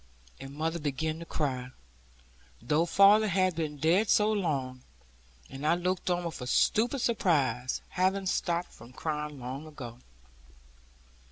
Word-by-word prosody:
And 135 +1 -9
mother 165 +2 -2
began 155 +2 -2
to 170 - -8
cry, 130 -4 -2 0.9
though 160 +3 +1
father 200 +4 +6
had 185 -2 +1
been 155 -2 -3
dead 175 +9 +2
so 210 +1 +4
long; 140 -11 -2 0.7
and 135 +2 -9
I 155 +3 +3
looked 180 +1 -2
on 175 0 0
with 165 -5 -5
a 125 - -5
stupid 235 - +2
surprise, 145 - +1
having 190 +2 0
stopped 175 -1 -1
from 120 +3 -14
crying 150 0 -4
long 130 +5 -6
ago. 125 -6 -9
160 Hz, 140 wpm, -29 LUFS, 135-185 Hz, 0.9 s, father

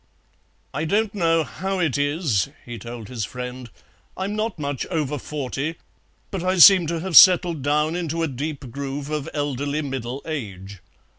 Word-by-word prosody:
"I 155 - -2
don't 205 +5 +1
know 165 -4 +2
how 190 +5 -4
it 170 -8 0
is," 145 - 0 0.2
he 120 -1 -7
told 115 -2 -8
his 120 -4 -4
friend, 125 +2 -6 0.5
"I'm 195 +2 -3
not 215 -1 -2
much 145 -3 -3
over 150 -4 -2
forty, 145 +3 -4 0.6
but 190 -3 -3
I 185 +1 +1
seem 180 0 +8
to 165 0 -2
have 185 -2 -3
settled 175 -2 +7
down 150 +3 +1
into 165 -1 -2
a - - +1
deep 140 -1 -5
groove 140 +2 -5
of 150 -2 -3
elderly 145 +1 -2
middle 130 -1 -5
age. 100 - -6
150 Hz, 160 wpm, -23 LUFS, 130-170 Hz, 0.6 s, seem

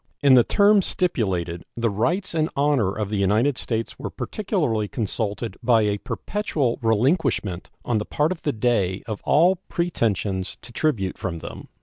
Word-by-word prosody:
In 140 -2 +7
the 125 -2 +7
terms 205 - +4
stipulated 90 - -1
the 115 -2 +1
rights 170 - -1
and 160 0 +1
honor 140 -8 +2
of 105 0 -4
the 105 - 0
United 110 +8 +2
States 115 -1 -3
were - - -4
particularly 155 - -1
consulted 110 +1 -3
by 115 -3 +4
a 105 -1 0
perpetual 150 - -2
relinquishment 115 - +1 0.2
on 115 -3 +1
the 105 - -4
part 150 +3 0
of 185 - -4
the 145 - 0
Dey 105 -6 0
of 110 -3 -5
all 175 +5 +4
pretensions 105 - -1
to 115 - -10
tribute 110 -13 -1
from 90 -3 -3
them. - - -9
115 Hz, 160 wpm, -23 LUFS, 105-150 Hz, 0.2 s, In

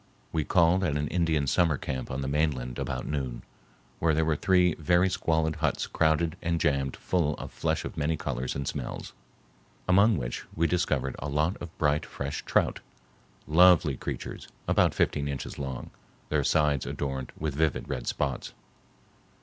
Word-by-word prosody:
We 80 - 0
called 85 +3 +3
at 75 -5 +1
an 75 0 -1
Indian 80 -4 +1
summer 80 +1 +2
camp 65 -1 -4
on 65 +1 -3
the 65 - -3
mainland 70 -4 -1
about - - -3
noon, 65 -5 -3 0.6
where 80 -2 +2
there 80 +1 +2
were 80 -1 +2
three 90 +1 +3
very 85 +4 +3
squalid 80 -2 0
huts 80 -3 0
crowded 80 0 +1
and 85 0 0
jammed 70 -3 +1
full 80 -5 0
of - - -8
flesh - - -1
of - - -7
many 80 +1 0
colors 65 -4 -3
and 70 -1 -3
smells, - - -5 0.7
among 100 +3 +5
which - - -4
we 85 - +2
discovered 70 -7 0
a 75 - -4
lot 75 +6 +1
of 85 -1 -8
bright 75 0 +2
fresh 70 0 -4
trout, - - +1 0.7
lovely 85 -2 +5
creatures - - -6 0.2
about - - +3
fifteen 70 0 +1
inches 70 -1 -5
long, 65 -3 -5 0.4
their - - +1
sides 75 -3 +2
adorned 65 -2 -3
with 75 -2 -2
vivid 80 +2 0
red - - -4
spots. 70 -3 -2
75 Hz, 165 wpm, -28 LUFS, 70-85 Hz, 0.7 s, among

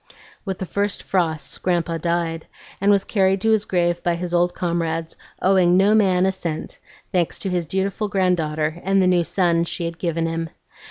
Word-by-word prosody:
With 190 -2 -3
the 190 - -4
first 200 +4 -2
frosts 165 -5 -1
Grandpa 170 -2 0
died, 170 -1 -2 0.3
and 200 - +3
was 200 -1 +4
carried 195 -2 +2
to 225 +1 +2
his 215 -1 +2
grave 175 -1 0
by 175 -1 0
his 175 0 -5
old 175 0 +2
comrades, 165 -2 -2 0.3
owing 185 -2 +4
no 200 +3 +4
man 190 -4 +3
a 190 - +2
cent, 170 -4 -5 0.3
thanks 180 -4 0
to 195 - -4
his 175 -2 -1
dutiful 195 +4 -1
granddaughter 165 -4 0
and 195 +1 +2
the 185 - +4
new 180 -1 +3
son 170 0 +1
she 170 0 -4
had 165 0 -5
given 165 -2 -1
him. 165 0 -3
175 Hz, 185 wpm, -22 LUFS, 165-190 Hz, 0.3 s, was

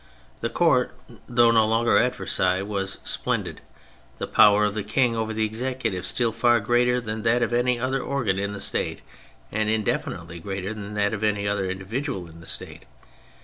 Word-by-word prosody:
The - - -2
Court, - - +2 0.3
though 120 -1 +5
no 110 -2 +4
longer 115 +2 +2
at 125 +1 +1
Versailles, 95 +1 +1
was 100 -1 -3
splendid, - - -2 0.6
the - - -3
power 105 0 +5
of 105 - 0
the 110 - -2
King 115 +3 +1
over 110 -1 -2
the 110 0 0
Executive 115 -4 -3
still 115 +4 0
far 120 +1 +3
greater 120 +3 +2
than 110 -2 -4
that 120 +2 +2
of - - -1
any 120 0 +2
other 130 +2 -1
organ 120 -10 -1
in 100 +1 -2
the 100 - -6
State, - - -2 0.5
and 110 0 0
indefinitely 90 -5 -2
greater 95 +3 -4
than 105 -1 -7
that 100 0 +1
of 110 0 -3
any 105 -1 +1
other 100 -2 0
individual 95 - -4
in 80 0 -14
the 85 - -12
State. - - -7
110 Hz, 185 wpm, -24 LUFS, 100-120 Hz, 0.6 s, though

